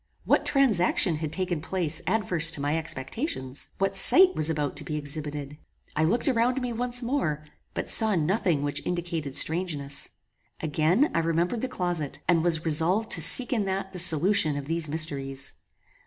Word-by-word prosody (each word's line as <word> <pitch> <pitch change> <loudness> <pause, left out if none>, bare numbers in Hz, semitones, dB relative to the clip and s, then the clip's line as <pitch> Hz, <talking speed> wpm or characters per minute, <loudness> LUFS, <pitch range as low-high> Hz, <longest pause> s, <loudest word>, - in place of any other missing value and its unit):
What - - +1
transaction 195 - +2
had 155 -1 -5
taken 175 -1 -3
place 165 -3 -2
adverse 180 -7 +2
to 165 - 0
my 145 +2 -1
expectations? 140 - -4
What 195 0 -1
sight 370 - +5
was 155 0 0
about 150 -3 -2
to 150 - -3
be 150 +2 -5
exhibited? 145 0 -6 0.4
I 155 - +1
looked 230 - +1
around 250 0 +1
me 250 -2 -4
once 245 +1 -2
more, 195 - -2 0.3
but - - -4
saw 220 -2 +4
nothing 165 -2 0
which 145 0 -3
indicated 170 -5 -4
strangeness. 150 -3 0 0.5
Again 160 - +1
I - - +1
remembered 165 +7 -1
the 260 - -2
closet, 175 - -3
and 170 -2 +2
was 165 -2 0
resolved 170 +8 +3
to 165 - +2
seek 245 +10 +6
in 215 -4 0
that 190 0 -4
the 180 - -3
solution 165 -2 +3
of 140 - -6
these 165 0 -3
mysteries. 140 -3 -2
165 Hz, 170 wpm, -26 LUFS, 150-195 Hz, 0.5 s, seek